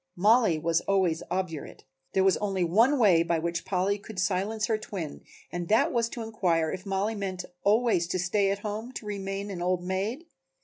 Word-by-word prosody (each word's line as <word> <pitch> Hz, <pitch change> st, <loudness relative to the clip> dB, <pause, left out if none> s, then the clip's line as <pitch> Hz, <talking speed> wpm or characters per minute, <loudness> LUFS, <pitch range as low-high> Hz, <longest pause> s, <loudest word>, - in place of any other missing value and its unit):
Mollie 215 Hz, -2 st, +4 dB
was 165 Hz, +1 st, +1 dB
always 185 Hz, -4 st, +1 dB
obdurate. 175 Hz, -4 st, -4 dB, 0.3 s
There 190 Hz, -, +3 dB
was 190 Hz, -1 st, +4 dB
only 195 Hz, -3 st, -1 dB
one 225 Hz, -, +4 dB
way 195 Hz, -9 st, +5 dB
by 170 Hz, 0 st, +1 dB
which 170 Hz, +1 st, -2 dB
Polly 190 Hz, +2 st, 0 dB
could 205 Hz, 0 st, -11 dB
silence 195 Hz, +4 st, 0 dB
her 220 Hz, -1 st, 0 dB
twin 185 Hz, -8 st, -6 dB, 0.3 s
and 175 Hz, -1 st, -4 dB
that 220 Hz, +4 st, +3 dB
was 230 Hz, -1 st, +1 dB
to 235 Hz, -, -5 dB
inquire 175 Hz, -8 st, 0 dB
if 185 Hz, +2 st, -6 dB
Mollie 195 Hz, +3 st, 0 dB
meant 190 Hz, -3 st, -4 dB, 0.2 s
always 210 Hz, -4 st, +3 dB
to 185 Hz, -, -1 dB
stay 195 Hz, +3 st, +1 dB
at 200 Hz, -, 0 dB
home, 220 Hz, +4 st, -4 dB
to 220 Hz, -, -7 dB
remain 200 Hz, 0 st, -4 dB
an 180 Hz, -3 st, -5 dB
old 180 Hz, 0 st, 0 dB
maid? 200 Hz, -, -2 dB
195 Hz, 190 wpm, -28 LUFS, 175-215 Hz, 0.3 s, way